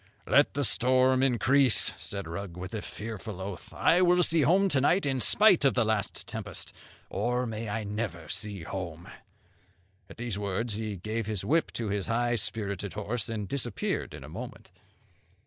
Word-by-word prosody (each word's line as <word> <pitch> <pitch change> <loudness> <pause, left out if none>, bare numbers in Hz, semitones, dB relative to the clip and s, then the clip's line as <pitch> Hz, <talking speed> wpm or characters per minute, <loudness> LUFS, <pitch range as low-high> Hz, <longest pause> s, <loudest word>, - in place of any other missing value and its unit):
'Let - - +4
the 145 - +1
storm 130 +1 +3
increase,' 130 0 +3
said 100 -3 -4
Rugg, 85 +1 -6
with 90 +3 -6
a 110 - -3
fearful 105 -3 -7
oath, 95 -1 -6
'I 175 +2 +3
will 180 0 +5
see 165 -1 +4
home 185 +8 +4
to 135 -6 +2
night, 175 +6 +3
in 135 -2 0
spite 205 - +5
of 135 - +4
the 120 -3 +3
last 110 -1 -1
tempest! 110 -5 -6 0.4
or 125 +1 0
may 110 -1 -4
I 110 +1 -2
never 100 -6 -4
see 100 0 -3
home.' 85 -2 -6 1.0
At - - -12
these 115 -4 -3
words 105 +3 -2
he 105 -1 -3
gave 110 +4 -3
his 105 -4 -3
whip 165 +2 +2
to 115 -3 -3
his 100 -1 -2
high 120 +1 +1
spirited 100 -3 -2
horse, 105 +2 -3
and 105 -3 -3
disappeared 120 -4 -2
in - - -10
a - - -9
moment. - - -8
110 Hz, 175 wpm, -29 LUFS, 100-130 Hz, 1.0 s, will